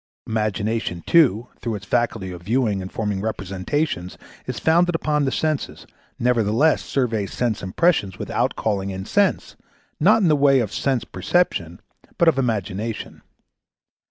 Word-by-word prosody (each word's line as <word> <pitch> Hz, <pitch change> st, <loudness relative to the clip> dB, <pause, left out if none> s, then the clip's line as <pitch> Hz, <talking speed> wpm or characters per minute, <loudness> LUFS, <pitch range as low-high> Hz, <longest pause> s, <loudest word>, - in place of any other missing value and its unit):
Imagination, 110 Hz, -4 st, -2 dB
too, 125 Hz, -, +4 dB
though 115 Hz, -2 st, -2 dB
its 100 Hz, -1 st, -8 dB
faculty 115 Hz, -4 st, -1 dB
of 90 Hz, -1 st, -8 dB
viewing 105 Hz, 0 st, 0 dB
and 95 Hz, -, -7 dB
forming 105 Hz, -3 st, -2 dB
representations 100 Hz, -, -3 dB, 0.3 s
is 125 Hz, -3 st, -4 dB
founded 170 Hz, +7 st, +3 dB
upon 150 Hz, -2 st, +1 dB
the 135 Hz, -, 0 dB
senses, 155 Hz, -1 st, -2 dB, 0.3 s
nevertheless 120 Hz, +5 st, +2 dB
surveys 115 Hz, -7 st, -1 dB
sense 120 Hz, -4 st, -1 dB
impressions 100 Hz, -, +1 dB
without -, -, -1 dB
calling 100 Hz, -3 st, -1 dB
in 95 Hz, 0 st, -5 dB
Sense, 200 Hz, -, +1 dB, 0.4 s
not 210 Hz, +7 st, +5 dB
in -, -, +4 dB
the 155 Hz, -, +4 dB
way 140 Hz, -1 st, +4 dB
of 110 Hz, -5 st, -2 dB
Sense 135 Hz, -4 st, 0 dB
perception, 90 Hz, -, -1 dB, 0.4 s
but 170 Hz, -, +3 dB
of 155 Hz, -5 st, +4 dB
Imagination. 110 Hz, -2 st, -3 dB
115 Hz, 140 wpm, -22 LUFS, 100-145 Hz, 0.4 s, not